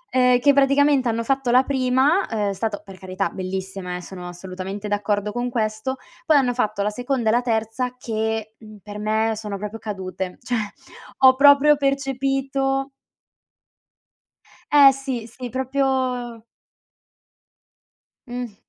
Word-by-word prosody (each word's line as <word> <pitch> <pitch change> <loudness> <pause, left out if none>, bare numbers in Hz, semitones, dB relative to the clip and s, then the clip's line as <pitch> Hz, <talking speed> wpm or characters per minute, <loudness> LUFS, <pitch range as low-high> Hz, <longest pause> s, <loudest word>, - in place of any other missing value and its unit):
ehm, 250 -1 +5
che 285 +2 +4
praticamente 275 -1 +3
hanno 230 +1 -1
fatto 270 0 0
la 255 +2 +5
prima, 265 +7 +2
uhm, 210 -2 -1
è - - -2
stata, 205 +2 -2
per 195 -2 -13
carità, 185 +1 -3
bellissima, 190 -1 -5
eh, 180 - -6
sono 180 0 -9
assolutamente 190 +3 -7
d'accordo 205 0 -1
con 245 +2 -2
questo. 220 +2 -2 0.3
Poi 310 -2 +6
hanno 250 -3 +2
fatto 215 -4 -1
la 210 - +1
seconda 245 0 -1
e - - +4
la 240 +2 +3
terza 230 +1 -2
che, 220 -2 -3
mhmm, 215 -1 -13
per 205 0 -8
me 220 +1 +1
sono 210 -2 -5
proprio 210 +3 -6
cadute, 190 -3 -5
cioè 245 0 -1 0.6
ho 260 -1 +7
proprio 285 +1 +6
percepito 270 0 -1 1.8
Eh 285 -2 +8
sì, 265 -4 -5
sì, 245 +1 -8
proprio 260 -3 -1 1.8
Mh. 245 -3 -6
240 Hz, 140 wpm, -22 LUFS, 210-265 Hz, 1.8 s, Eh